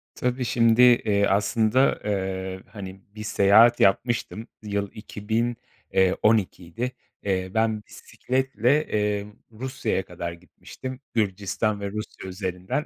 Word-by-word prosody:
Tabii, 125 0 -1
şimdi, 115 0 +3
eee, 110 -5 +5
aslında, 110 +5 +2
eee, 95 -2 -2
hani, 95 -2 -9
bir 105 - -6
seyahat 110 +4 +5
yapmıştım. 115 +2 +1 0.2
Yıl 100 -1 -2
2000, 110 +3 -2 0.4
eee, 95 -1 +4
12'ydi. 110 +1 +1 0.3
Eee, 95 -2 -1
ben 110 -1 +1
bisikletle, 130 +5 -1
eee, 105 -1 0 0.3
Rusya'ya 130 -4 -3
kadar 85 -1 -5
gitmiştim. 125 - -9
Gürcistan 105 0 0
ve 100 -1 -3
Rusya 105 -2 -6
üzerinden. 95 - -3
105 Hz, 110 wpm, -25 LUFS, 95-120 Hz, 0.4 s, eee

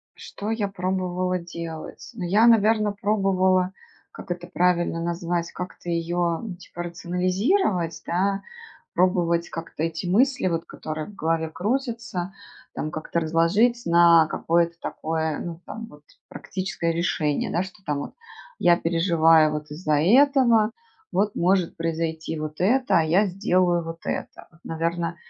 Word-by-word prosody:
Что 210 +2 -6
я 220 -2 0
пробовала 185 -1 -1
делать? 170 +1 -8
Ну, 220 -6 -6
я, 205 +6 +4
наверно, 215 -2 +4
пробовала, 195 -3 +1 0.4
как - - -11
это 175 0 -4
правильно 175 -2 +1
назвать, 170 0 -2
как-то 180 -1 -7
её, 170 +1 -1 0.2
типа, 175 0 -7
рационализировать, 180 - 0
да, 195 +3 0 0.5
пробовать 175 -2 +2
как-то 165 -2 -6
эти 165 +1 -2
мысли, 255 +6 +2
вот 165 -2 -1
которые 155 0 -6
в 210 - -12
голове 160 -2 -1
крутятся, 230 - -3 0.4
там, 155 - -3
как-то 155 +2 -2
разложить 170 +10 +2
на 170 -1 +6
какое-то 170 +1 +1
такое, 160 -1 -2
ну 170 -1 -6
там 225 +1 -7
вот, 150 0 -17 0.2
практическое 185 -3 -3
решение: 155 -3 0
да, 175 - +1
что 190 +2 -10
там 150 -1 -1
вот 145 - -6 0.4
я 175 -1 +5
переживаю 165 -2 +4
вот 150 -1 -5
из-за 150 -1 0
этого, 235 - +5 0.4
вот 205 +1 +1
может 180 0 +1
произойти 160 -1 -3
вот 155 0 -6
это, 245 +6 +3
а - - +2
я 175 +7 +3
сделаю 180 -2 +1
вот 165 0 -7
это. - - -5
Вот, 155 - -23
наверно, 170 +1 -2
175 Hz, 140 wpm, -24 LUFS, 165-195 Hz, 0.5 s, на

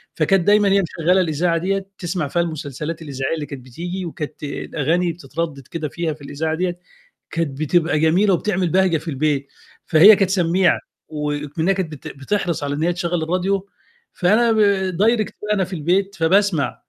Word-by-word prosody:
فكانت 175 +3 +2
دايمًا 205 -1 +5
هي 195 0 +4
مشغّلة 180 +1 +1
الإذاعة 165 +1 +1
ديّة 195 +3 -1
تسمع 175 -3 -2
فيها 170 +5 0
المسلسلات 155 -1 -5
الإذاعية 140 0 -3
اللي 150 - -4
كانت 135 -3 -9
بتيجي، 175 +8 -5
وكانت 155 -3 -7
الأغاني 160 +4 -1
بتتردد 150 -3 -5
كده 155 -3 -4
فيها 170 -2 -2
في 150 - -16
الإذاعة 155 +3 -3
ديّة، 175 +1 -2 0.5
كانت 150 -5 -2
بتبقى 155 0 +2
جميلة 180 +6 +3
وبتعمل 185 -1 0
بهجة 185 -1 +3
في 155 - -11
البيت. 140 -1 0 0.4
فهي 185 +7 +8
كانت 195 -2 +1
سميعة 180 -1 +2 0.3
وإكمنّها 150 +3 -1
كانت 185 -4 -3
بت 145 - -9
بتحرص 170 +3 -2
على 145 0 -2
إن 150 - -2
هي 175 +1 +2
تشغل 175 -1 -2
الراديو 185 +4 -1 0.4
فأنا 220 +6 +3
ب 220 - +1 0.4
direct 215 +2 +2
وأنا 210 -2 0
في 185 +1 -6
البيت 185 +5 0
فباسمع، 175 -2 +1
170 Hz, 165 wpm, -20 LUFS, 150-190 Hz, 0.5 s, فهي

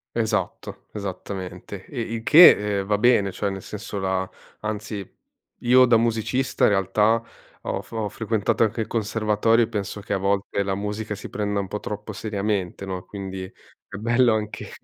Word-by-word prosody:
Esatto, 110 -2 -2
esattamente 95 -1 -6
e 130 - -7
il 115 0 -4
che, 105 - +7
ehm, 95 - -3
va 105 - +2
bene, 105 -3 +3
cioè 100 +2 -2
nel 95 -1 -6
senso 105 -1 -6
la, 95 0 -1 0.3
anzi 105 -2 -4 0.5
io 125 +1 +6
da 120 -2 +5
musicista 115 +3 0
in - - +7
realtà 105 +3 +2 0.4
ho - - -3
f - - -21
ho 110 -2 -2
frequentato 110 +1 0
anche 110 +1 0
il - - -3
conservatorio 110 +1 +2
e - - -11
penso 105 -2 -4
che 100 - -4
a 100 - +2
volte 100 +1 0
la 95 -1 -1
musica 105 +2 -4
si 105 - -8
prenda 105 -1 -1
un 95 - -3
po' 105 - -4
troppo 105 +1 -6
seriamente, 100 -3 -2
no, 95 -1 -5
quindi 95 -2 -6
è 95 - -14
bello 120 +2 +3
anche 105 -1 -4
105 Hz, 175 wpm, -24 LUFS, 100-110 Hz, 0.5 s, che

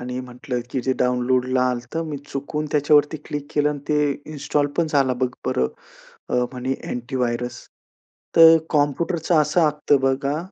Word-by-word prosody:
आणि 125 +1 -5
म्हटलं, 125 0 -5
की 130 - -1
जे 130 - +1
डाउनलोडला 125 +1 +1
आलं, 120 -1 -2
तर 165 - 0
मी 150 -2 -5
चुकून 150 +2 -4
त्याच्यावरती 150 +1 +3
क्लिक 145 -1 -5
केलं 150 0 +3
आणि 145 - -4
ते 150 -1 +2 0.3
इन्स्टॉल 145 0 0
पण 165 - +3
झालं 135 -4 +1
बघ 130 -1 +1 0.2
बरं, 65 0 +1 0.6
अ, - - -3 0.2
म्हणे 130 +1 -2 0.2
अँटीव्हायरस, 120 -1 -2 0.8
तर 165 0 +9
कॉम्प्युटरचं 160 +3 +1
असं 155 +2 +2
असतं 150 -1 +1
बघा, 135 +2 0
140 Hz, 155 wpm, -22 LUFS, 125-150 Hz, 0.8 s, तर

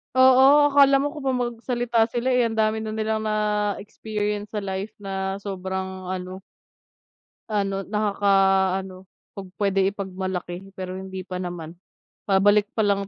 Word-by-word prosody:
Oo, 265 +3 +6
akala 275 -1 +5
mo 290 - -1
kung 300 -3 -8
'pag 265 -1 +1
magsalita 240 -1 0
sila, 245 +2 -1
eh, 245 -2 +3
ang 225 - -5
dami 220 0 +1
na 220 0 -4
nilang 220 0 -1
na-experience 210 0 -2
sa 210 - -2
life 195 +2 -4
na 190 0 -3
sobrang 190 -1 -5
ano 185 0 -5 1.1
ano, 195 -2 -1
nakaka-ano 195 -2 +1 0.2
'pag 195 -2 -8
pwede 195 -1 0
ipagmalaki 190 -2 -4
pero 185 0 -5
hindi 190 -1 -7
pa 185 -1 -6
naman. 175 -2 -6 0.5
Pabalik 205 +1 +4
pa 220 - +2
lang, 200 -1 +1
205 Hz, 140 wpm, -24 LUFS, 190-220 Hz, 1.1 s, Oo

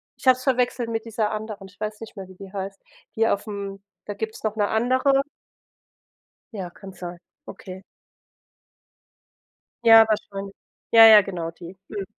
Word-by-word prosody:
Ich - - -15
habe 255 -1 +7
es 255 - -11
verwechselt 250 -2 0
mit 225 0 -3
dieser 220 -2 -1
anderen, 215 -2 -6
ich 200 - -21
weiß 215 0 -4
nicht 225 - -10
mehr, 190 - -7
wie 185 - -14
die 190 +1 -12
heißt 195 0 -6 0.3
hier 225 -2 +2
auf'm 200 -1 -7 0.2
da 205 - -6
gibt's 220 +2 -6
noch 215 -1 -2
'ne 205 -2 +1
andere. 260 +4 +2 1.3
Ja, 195 -5 -5
kann 195 +2 -12
sein, 175 -1 -8 0.3
okay. 185 0 -10 2.0
Ja, 225 -1 +9
wahrscheinlich. 200 -2 -3 0.4
Ja, 225 -1 +10
ja, 215 -2 +9
genau, 175 -4 -5
die. 170 +2 -12
Mhm. 205 -2 -5
210 Hz, 160 wpm, -23 LUFS, 195-225 Hz, 2.0 s, Ja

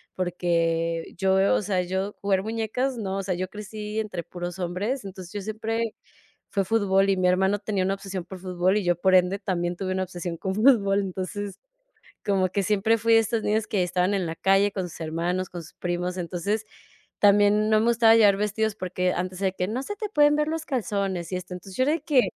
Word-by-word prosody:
porque 165 -2 -1
yo, 190 +1 +3
o - - +1
sea, 190 -2 0
yo 190 +3 -2
jugar 195 -1 +2
muñecas, 225 +4 -2
no. 195 -3 -3
O 195 - -2
sea, 185 -1 -1
yo 185 +1 -3
crecí 210 +1 -6
entre 185 -6 -4
puros 175 +1 -6
hombres. 200 +9 -2
Entonces, 185 -1 -9
yo 205 - -3
siempre 220 +2 -2 0.6
fue 195 -2 0
fútbol 195 -1 +2
y 195 - +2
mi 185 0 +2
hermano 190 +3 +3
tenía 205 -3 -1
una 195 +1 0
obsesión 195 -2 -6
por 190 +1 -9
fútbol, 185 +1 +1
y 210 - 0
yo, 175 0 +2
por 185 +2 +3
ende, 185 +2 +3
también 175 -2 -2
tuve 185 +1 -3
una 190 0 0
obsesión 175 -2 -5
con 190 +2 -3
fútbol. 210 -4 +4
Entonces, 195 +1 -5 0.7
como 190 -2 +2
que 200 +2 0
siempre 215 +3 +2
fui 230 +1 +3
de - - +8
estos 225 0 -1
niños 215 +1 +1
que 195 -4 0
estaban 180 +2 +1
en 190 -3 0
la 165 0 -4
calle 195 +1 +3
con 185 -3 -3
sus 170 - -12
hermanos, 170 +3 -2
con 175 - -6
sus 160 - -15
primos. 180 +1 -3
Entonces, 185 +5 -2 0.5
también 205 +1 +5
no 215 - +5
me 225 - +1
gustaba 230 -1 +5
llevar 205 -3 +6
vestidos 210 +1 0
porque 180 -2 -1
antes 185 +1 -3
era 195 - +2
de 185 - -5
que: 180 - 0
"No 245 +5 -2
se 415 +7 -5
te 425 0 -4
pueden 295 -4 +4
ver 300 0 +1
los 320 0 -3
calzones 200 - -2
y - - 0
esto". 180 0 -7
Entonces, 185 +1 -10
yo 255 - +3
de 315 +3 +1
que: 270 -6 +4
195 Hz, 220 wpm, -25 LUFS, 180-215 Hz, 0.7 s, de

